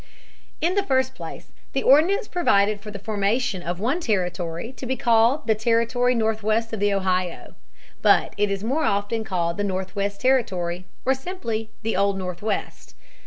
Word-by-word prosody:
In 340 +3 +2
the 400 - +2
first 260 -8 +1
place - - -9 0.2
the 270 - 0
ordinance 335 +10 +4
provided 205 - +2
for 210 - -8
the 205 - -6
formation 205 +1 -1
of 175 +1 -4
one 255 - 0
territory 180 - -2
to 260 - -6
be 260 - 0
called 235 +4 +3
the 220 - +4
Territory 235 +3 +1
Northwest 220 0 0
of 220 - -2
the 205 0 +2
Ohio. 185 -3 -1 0.5
But - - +4
it 205 0 +1
is 200 0 -2
more 275 +8 0
often 205 0 0
called 175 -4 -1
the 205 - -1
Northwest 200 +1 -2
Territory 185 -9 +1 0.2
or 265 - +4
simply 245 -8 -4
the 225 - -1
Old 200 +1 +2
Northwest. 185 +3 -4
215 Hz, 165 wpm, -24 LUFS, 195-250 Hz, 0.5 s, ordinance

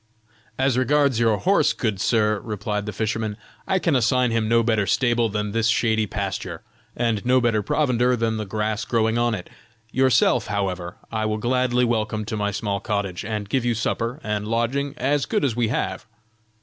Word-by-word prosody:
"As 130 -1 +2
regards 140 -2 +2
your 115 -2 +3
horse, 195 - +3
good 110 -7 -2
sir," 110 -2 +2
replied 105 -1 -4
the - - -2
fisherman. 110 -1 -2 0.3
"I 190 - +2
can 170 -5 +1
assign 125 0 +2
him 115 -1 0
no 115 0 +4
better 110 -3 +1
stable 120 +2 +2
than 105 0 -2
this 115 +1 +1
shady 110 -2 +2
pasture, 95 -4 -4 0.3
and 115 -4 0
no 130 +1 +4
better 115 -3 +1
provender 125 +1 +1
than 115 -1 -1
the 105 -2 -4
grass 105 +1 -2
growing 115 0 +1
on 120 -1 +1
it. 90 - -8 0.4
Yourself, 130 -3 +3
however, 95 -4 -3
I 110 -1 -1
will 110 0 -1
gladly 125 +2 +1
welcome 110 -2 -1
to 110 - -4
my 105 -1 0
small 100 -1 -2
cottage, 100 -3 -3
and 105 -1 -4
give 130 +4 0
you 120 -1 +1
supper 115 +3 -2
and 105 -1 -2
lodging 130 +6 -1
as 145 0 0
good 210 -9 +1
as 125 -5 0
we 120 -2 +1
have." 120 - -2
115 Hz, 185 wpm, -23 LUFS, 105-125 Hz, 0.4 s, no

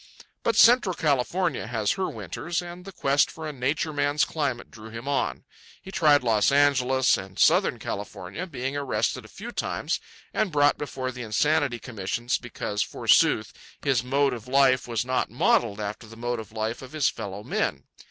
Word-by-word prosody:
But - - +1
Central 230 -6 +6
California 150 0 0
has 110 -3 0
her 190 - -1
winters, 115 - -4
and 175 0 -8
the 195 - -8
quest 140 -5 +2
for 160 -1 -7
a 150 - -5
Nature 145 +4 -1
Man's 145 +1 +2
climate 140 -6 -3
drew 110 0 -11
him 115 +4 -8
on. 140 -1 -1 0.4
He 190 - -11
tried 150 -7 +4
Los 110 0 +3
Angeles 135 -2 +3
and 95 0 -9
Southern - - +4
California, 100 - -6
being 135 -4 -4
arrested 140 -2 -1
a - - -11
few - - -8
times - - -2 0.3
and 215 -4 0
brought 145 -1 +3
before 130 -3 -4
the 125 -1 -8
insanity 130 +3 +1
commissions 120 +1 -3
because, 105 -3 -4
forsooth, - - +3 0.3
his 130 -4 +2
mode 135 +1 +2
of 120 -1 -8
life 130 -1 +3
was 115 -1 -1
not 130 0 0
modelled 115 -2 +2
after 105 +2 -5
the 115 +1 -13
mode 120 0 -2
of 110 0 -9
life 110 +1 -3
of 130 +2 -11
his 155 -3 +2
fellow 100 +1 -4
men. - - -1
130 Hz, 175 wpm, -26 LUFS, 115-145 Hz, 0.4 s, Central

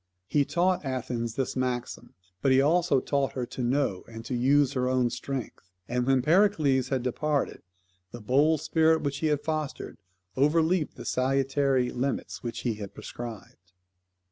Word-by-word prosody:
He 145 +8 +2
taught 180 +3 +1
Athens 120 -3 -3
this 135 - -2
maxim; 125 -1 -3 0.3
but 135 - +3
he 130 - +5
also 160 0 +3
taught 140 0 -1
her 125 -2 -2
to 125 - -7
know 120 -6 0
and 115 0 -9
to - - -4
use 135 +3 +3
her 125 -1 0
own 125 -2 +1
strength, 125 -5 -6 0.2
and 125 +1 -1
when 135 -2 +3
Pericles 155 -6 +3
had 130 -3 -1
departed 145 +3 -1 0.5
the 120 - -8
bold 145 +7 +2
spirit 160 0 +2
which 140 -1 -2
he 160 - 0
had 150 -1 0
fostered 155 -8 -4 0.4
overleaped 160 +4 +2
the - - -9
salutary 135 0 +1
limits 130 +2 -3
which 115 -1 -5
he 120 - 0
had 100 - -7
prescribed. 100 -7 -9
135 Hz, 160 wpm, -27 LUFS, 125-150 Hz, 0.5 s, he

